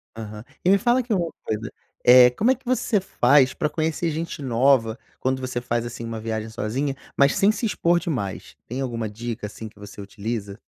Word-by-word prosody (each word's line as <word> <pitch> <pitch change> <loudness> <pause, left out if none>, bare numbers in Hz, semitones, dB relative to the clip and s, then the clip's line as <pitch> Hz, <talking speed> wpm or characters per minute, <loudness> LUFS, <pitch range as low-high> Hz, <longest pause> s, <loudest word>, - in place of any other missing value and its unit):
Aham. 110 -1 -8 0.2
E - - +5
me 200 - +6
fala 240 +5 +2
aqui 245 -3 -1
uma 170 -4 0
coisa: 110 +1 -3 0.3
eh, 125 0 +9
como 220 - +2
é - - +3
que 260 - -26
você 245 -4 +1
faz 135 -6 +3
pra 150 - -1
conhecer 160 +1 -1
gente 160 0 -4
nova 125 -2 +2 0.2
quando 130 0 0
você 130 -1 -3
faz, 120 -1 -1
assim, 120 0 -6
uma 115 -1 -5
viagem 110 0 -3
sozinha, 125 +6 -2 0.2
mas 140 0 +4
sem 200 +2 +4
se 220 +2 -3
expor 175 -5 +2
demais? 130 - -4
Tem 125 +3 -4
alguma 115 -4 -3
dica, 115 0 -5
assim, 110 +2 -8
que 105 - -22
você 105 0 -10
utiliza? 100 0 -5
125 Hz, 200 wpm, -24 LUFS, 110-165 Hz, 0.3 s, eh